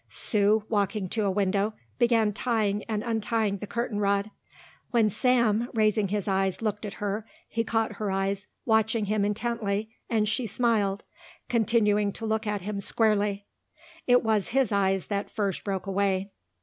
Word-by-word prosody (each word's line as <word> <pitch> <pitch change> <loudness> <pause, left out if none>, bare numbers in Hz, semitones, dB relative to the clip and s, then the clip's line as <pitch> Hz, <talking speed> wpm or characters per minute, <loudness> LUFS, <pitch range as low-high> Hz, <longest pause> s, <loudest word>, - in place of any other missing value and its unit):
Sue, 210 0 +2
walking 205 -2 0
to 215 +1 0
a - - +2
window, 200 +2 0 0.2
began 230 -3 +3
tying 210 -2 0
and 215 -1 -2
untying 225 -2 0
the 210 - -7
curtain 235 -2 -2
cord. 200 +1 +1 0.6
When 225 -4 +3
Sam, 235 -1 +2
raising 215 -1 +2
his 205 +1 -2
eyes, 195 -1 +1
looked 210 -1 -2
at 200 - -7
her, 205 +2 -2 0.2
he 230 - -1
caught 225 -2 -1
her 210 -2 -2
eyes 195 +1 -1 0.2
watching 220 -1 +2
him 210 0 0
intently 215 0 -1 0.2
and 215 -2 +2
she 225 +3 0
smiled, 210 -3 +1 0.5
continuing 210 -3 +2
to 225 - -6
look 220 0 -1
at 205 -1 -1
him 205 0 -3
squarely. 205 -1 +1 0.6
It 245 0 +5
was 220 -3 +1
his 265 -3 +1
eyes 195 -2 +1
that 200 -1 -3
first 200 -4 -2
broke 195 -2 -3
away. 195 0 0
210 Hz, 160 wpm, -27 LUFS, 200-225 Hz, 0.6 s, It